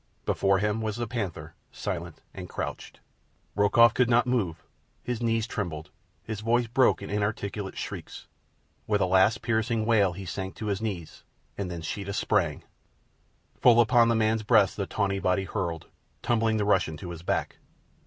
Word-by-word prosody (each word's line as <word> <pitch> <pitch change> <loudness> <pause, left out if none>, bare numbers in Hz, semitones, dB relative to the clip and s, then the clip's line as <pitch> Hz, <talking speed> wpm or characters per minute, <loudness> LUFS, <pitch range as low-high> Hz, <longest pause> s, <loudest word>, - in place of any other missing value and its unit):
Before 95 -1 +2
him 105 +3 0
was 110 -2 -2
the 120 +1 -2
panther, 105 -6 -5 0.2
silent - - -5
and - - -8
crouched. - - -6 0.5
Rokoff 110 +3 +5
could 125 0 +2
not 120 0 +4
move. 115 -10 -1 0.4
His 120 -1 -3
knees 115 -1 +1
trembled. 85 -9 -5 0.3
His 110 -2 -5
voice 120 +2 +1
broke 120 -2 +2
in 100 - -7
inarticulate 105 -1 -3
shrieks. - - -7 0.6
With 105 -1 +2
a 95 - +3
last 95 +4 +3
piercing 110 -1 0
wail 105 -5 +3
he 95 +2 -8
sank 95 +1 -5
to 110 - -6
his 95 - -5
knees—and 90 - -7
then 85 -2 -6
Sheeta 100 +4 -4
sprang. - - 0 1.0
Full 120 -2 +6
upon 120 0 +5
the 115 - +2
man's 110 0 +2
breast 105 -2 +4
the 100 -2 -3
tawny 100 -2 -1
body 95 +1 +1
hurtled, 85 -4 -3 0.4
tumbling 115 -2 +1
the 105 - 0
Russian 80 -6 +1
to 90 +2 -7
his 85 -2 -8
back. 85 - -2
105 Hz, 165 wpm, -27 LUFS, 95-115 Hz, 1.0 s, Full